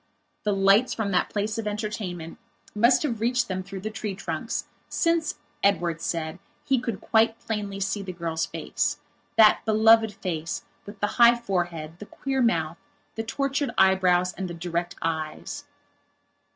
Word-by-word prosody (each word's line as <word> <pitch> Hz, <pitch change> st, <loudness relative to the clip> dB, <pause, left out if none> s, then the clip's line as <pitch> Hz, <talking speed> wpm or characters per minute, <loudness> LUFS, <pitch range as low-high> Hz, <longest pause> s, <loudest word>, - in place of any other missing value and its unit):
The 210 Hz, -, +2 dB
lights 195 Hz, +5 st, +4 dB
from 215 Hz, -3 st, -1 dB
that 180 Hz, -, +2 dB
place 210 Hz, +1 st, -2 dB
of 220 Hz, -, -3 dB
entertainment 205 Hz, -5 st, -4 dB, 0.3 s
must 235 Hz, +6 st, +4 dB
have 235 Hz, -7 st, -2 dB
reached 245 Hz, +1 st, +1 dB
them 185 Hz, -1 st, -2 dB
through 195 Hz, 0 st, -8 dB
the 215 Hz, +2 st, -4 dB
tree 215 Hz, -2 st, -4 dB
trunks, 185 Hz, +4 st, -3 dB, 0.2 s
since, 335 Hz, -2 st, +1 dB, 0.3 s
Edward 175 Hz, -4 st, +1 dB
said, 165 Hz, 0 st, -3 dB, 0.3 s
he 265 Hz, -2 st, +2 dB
could 235 Hz, -5 st, -3 dB
quite 225 Hz, 0 st, +2 dB
plainly 205 Hz, -3 st, -4 dB
see 200 Hz, +1 st, -1 dB
the 190 Hz, -1 st, -5 dB
girl's 165 Hz, -2 st, -2 dB
facethat 215 Hz, -1 st, +1 dB
beloved 220 Hz, 0 st, +5 dB
face 170 Hz, -5 st, -4 dB, 0.2 s
with 205 Hz, 0 st, -10 dB
the 205 Hz, +4 st, -1 dB
high 235 Hz, 0 st, +9 dB
forehead, 175 Hz, -7 st, -3 dB
the 210 Hz, -, -9 dB
queer 270 Hz, -1 st, -2 dB
mouth, 165 Hz, -8 st, +1 dB, 0.3 s
the 225 Hz, -, -3 dB
tortured 275 Hz, +4 st, -1 dB
eyebrows, 185 Hz, -1 st, +4 dB
and 190 Hz, -, -4 dB
the 170 Hz, -, -6 dB
direct 175 Hz, 0 st, -3 dB
eyes. 160 Hz, -1 st, -3 dB
200 Hz, 150 wpm, -26 LUFS, 175-225 Hz, 0.3 s, high